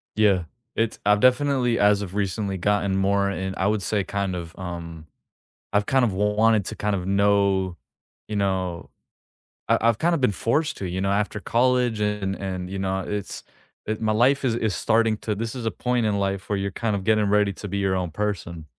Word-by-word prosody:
Yeah. 100 -4 +3 0.3
It's 115 0 -1
I've 105 0 +4
definitely, 130 -1 +3
as 105 0 +4
of 95 -1 -6
recently, 100 0 -1
gotten 100 +1 +1
more 100 +1 +2
in 95 -1 -3
I 95 - +1
would 105 0 +1
say 100 0 0
kinda, 95 -4 -3
um 85 -3 -7 0.6
I've 105 0 +2
kinda 130 0 +3
wanted 105 +1 +2
to - - -5
kind 105 -1 -1
of 90 -2 -4
know, 100 -2 +2 0.5
you 105 - -4
know 95 -4 -1 0.8
I - - +4
I've 115 -1 +2
kinda 170 +1 +2
been 125 -6 +2
forced 145 - 0
to, 95 - -4
you 95 +2 -3
know, 95 0 +1
after 105 +1 0
college 125 0 +1
and 105 -2 -1
and, 95 -2 -5
you 95 +1 -4
know, 95 0 -1
it's, 105 -1 -4 0.4
it 110 +1 -3
my 110 -1 +1
life 130 +6 +3
is, 120 -3 +1
is 110 -5 -1
starting 115 +1 +2
to 105 0 -3
this 115 +3 -4
is 125 -3 -5
a 110 - 0
point 125 -2 -1
in 105 -1 +1
life 100 -1 -2
where 100 - +1
you're 100 0 -2
kinda 105 0 -1
getting 105 +2 +2
ready 105 -1 +3
to 100 - -8
be 100 +1 -3
your 95 -1 +1
own 90 -2 -2
person. 85 -4 -3
100 Hz, 200 wpm, -24 LUFS, 95-110 Hz, 0.8 s, I've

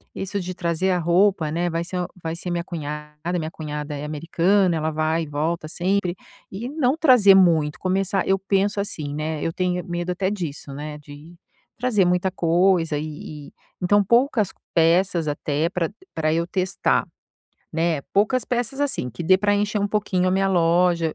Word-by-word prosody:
isso 195 +1 -3
de 185 +1 -5
trazer 170 +1 -1
a 180 - +2
roupa, 175 -1 +2
né, 175 +2 0
vai 165 0 -2
ser 180 +2 -5
uma 180 - -2 0.2
vai 165 0 -3
ser 175 +1 -5
minha 170 0 -1
cunhada, 150 0 -5
minha 160 0 -4
cunhada 150 -2 -5
é 145 +1 -5
americana, 170 +5 +1
ela 160 0 -1
vai 155 +1 0
e - - -7
volta 155 +3 -2
sempre. 180 +2 -1 0.4
E 210 +6 -5
não 285 -1 +1
trazer 250 -11 +6
muito, 165 -4 +3
começar 190 +1 0
eu 195 0 +2
penso 195 +1 0
assim, 150 -7 -4
né, 155 0 -3
eu 165 - -1
tenho 180 0 -1
medo 175 +1 -3
até 185 +2 -1
disso, 155 -8 -5
né, 150 +1 -6
de 150 +3 -13 0.4
trazer 220 -6 +2
muita 180 +1 +1
coisa 170 -2 +2
e 150 -1 -7
e - - -30 0.3
então 205 +3 +4
poucas 235 -1 +2 0.2
peças 170 0 +3
até 145 +1 -1
pra 170 -2 -1 0.3
pra 155 -1 +1
eu 170 +1 0
testar, 185 0 0 0.7
né. 165 -2 0
Poucas 220 +5 +2
peças, 245 +3 -2
assim, 280 - -1
que 125 - -7
dê 185 +3 +4
pra 205 +1 +2
encher 205 +1 0
um 205 - 0
pouquinho 200 -3 0
a - - +1
minha 195 +1 +2
loja 170 -2 +2
175 Hz, 180 wpm, -23 LUFS, 155-195 Hz, 0.7 s, trazer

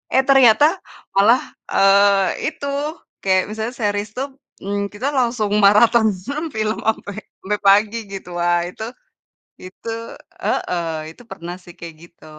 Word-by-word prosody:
Eh, 265 - +5
ternyata 265 -1 +6 0.5
malah, 220 +6 +5 0.3
eee, 195 0 +3
itu, 310 -2 -5 0.6
kayak 190 -1 +3
misalnya 220 +3 -4
series 205 -2 -2
tuh, 270 +2 -4 0.3
mmm, 200 +1 -2
kita 245 +7 -3
langsung 235 -4 0
maraton 220 +3 +5
mhm, 280 - -5
film 215 0 -1
sampai 205 -2 -1 0.3
sampai 210 +2 -1
pagi 210 +3 +4 0.2
gitu. 190 -2 -7
Wah, 175 0 +2
itu 200 - -8 0.8
itu 185 +5 -8 0.5
heeh, 175 -2 -1 0.3
itu - - -16
pernah 175 -2 -7
sih 175 - -12
kayak 170 -1 -9
gitu. 170 -1 -18
205 Hz, 135 wpm, -20 LUFS, 195-235 Hz, 0.8 s, ternyata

